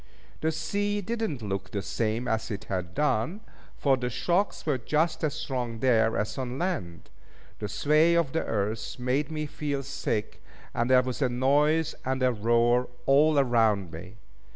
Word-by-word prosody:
The 160 - +1
sea 205 +6 -1
did 225 +4 -3
not 130 -7 -6
look 100 -2 -3
the 100 -2 -3
same 115 +2 -1
as 110 -1 -1
it 105 -3 -4
had 90 -2 -4
done, 150 - 0 0.4
for 135 -2 +3
the 125 -1 -2
shocks 175 - 0
were 145 -5 +1
just 155 +8 0
as 150 -2 0
strong 125 -6 -3
there 115 -2 +3
as 105 +6 -2
on 130 0 -3
land. 140 - -3 0.5
The 105 - -4
sway 155 +10 +3
of 170 -5 +2
the 160 - 0
earth 105 0 -2
made 130 +3 0
me 155 -1 -3
feel 145 -2 -3
sick; 125 -5 -3 0.3
and 120 +1 0
there 130 -1 +6
was 130 +2 -4
a 130 - +3
noise 145 +6 +2
and 130 0 -1
a 130 - +4
roar 120 +2 +2 0.2
all 150 +2 +5
around 110 -9 +2
me. 85 +5 -9
130 Hz, 175 wpm, -27 LUFS, 110-150 Hz, 0.5 s, there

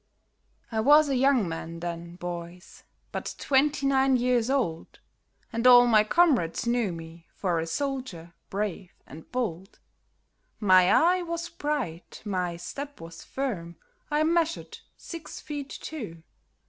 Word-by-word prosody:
I 220 - -1
was 295 +5 +6
a 270 - +1
young 255 -5 +3
man 165 0 -6
then, 170 0 -6
boys, 175 0 -8 0.3
but - - -5
twenty 280 +1 +2
nine 270 -1 +3
years 245 -1 +1
old, 240 -13 -2 0.5
And 230 +2 +2
all 245 -1 +9
my 220 -3 +5
comrades 245 - +2
knew 235 -4 +1
me 165 0 -10
for 175 -4 0
a 165 - -3
soldier 230 - -4 0.2
brave 200 -2 -3
and 155 +4 -13
bold; 195 -7 -3 0.8
My 185 -3 +5
eye 360 +3 +4
was 340 0 -4
bright, 290 - -4
my 180 -4 -2
step 280 +11 -7
was 165 0 -10
firm, 190 -11 -4 0.3
I 300 +1 +2
measured 335 0 0 0.2
six 335 -2 -8
feet 290 -2 -6
two. 205 - -7
230 Hz, 135 wpm, -27 LUFS, 170-280 Hz, 0.8 s, all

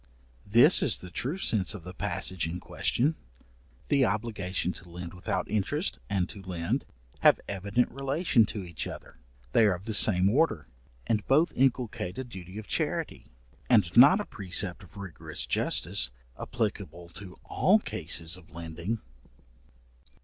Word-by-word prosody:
This 120 - +6
is 115 - +5
the 90 - -9
true 135 - -2
sense 105 - +1
of 95 - -9
the 90 +2 -9
passage 90 -2 0
in 85 +2 -5
question. 140 - 0 0.8
The 140 -2 +4
obligation 100 -5 -1
to 90 - -13
lend 85 +1 -8
without 90 - -3
interest, 105 -2 -1
and 95 -3 0
to 100 - -10
lend, 90 -3 -3 0.3
have - - +5
evident 100 +5 0
relation 135 - +2
to 105 -3 -5
each 85 -3 -5
other; - - -10 0.3
they 110 - +5
are 95 - +2
of 90 - -11
the 110 - -3
same 95 -3 +5
order, 115 - +1 0.4
and 110 -2 0
both 155 +6 +3
inculcate 120 -7 0
a 130 - -3
duty 95 -5 -10
of 110 - -7
charity, - - -2 0.4
and 105 -9 +3
not 140 - +8
a 210 - -3
precept 95 -1 -1
of 95 +2 -16
rigorous 95 -5 -6
justice, - - +1 0.3
applicable 85 +1 -4
to 95 0 -8
all 200 +4 +3
cases 85 - -2
of 90 - -17
lending. 85 +7 -5
100 Hz, 150 wpm, -28 LUFS, 90-120 Hz, 0.8 s, not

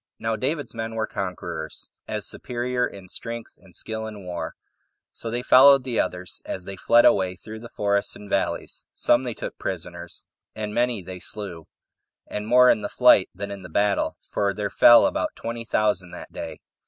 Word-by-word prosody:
Now 115 0 -1
David's 140 +4 -2
men 115 0 -4
were 110 -1 0
conquerors, 90 -6 -5 0.2
as - - -3
superior 125 0 -2
in 95 -2 -12
strength 115 +4 -7
and 95 -3 -18
skill 110 0 -4
in 105 -3 -9
war; 90 -1 -5 0.6
so 115 - -6
they 120 +2 -2
followed 135 +1 +7
the 125 -3 -1
others 90 -1 -2
as 95 - -5
they 95 +2 -7
fled 115 +5 +5
away 95 -1 +4
through 110 +4 -9
the 120 +1 -10
forests 100 0 0
and 105 - -11
valleys; - - -2
some 120 +2 +3
they 120 -3 -3
took - - -7
prisoners, 85 -1 -5 0.3
and 105 -1 -4
many 120 -4 0
they 90 +1 -8
slew, 90 -5 -6 0.6
and 105 0 -5
more 125 +2 +7
in - - +1
the 100 - -3
flight 125 -6 +5
than 100 +2 -5
in 100 -1 -7
the 90 - -10
battle 100 +4 +1
for 100 -1 -2
there 105 0 -2
fell 120 0 +8
about - - -1
twenty 115 0 -5
thousand 105 -5 +1
that - - -10
day. - - -6
105 Hz, 185 wpm, -24 LUFS, 95-120 Hz, 0.6 s, fell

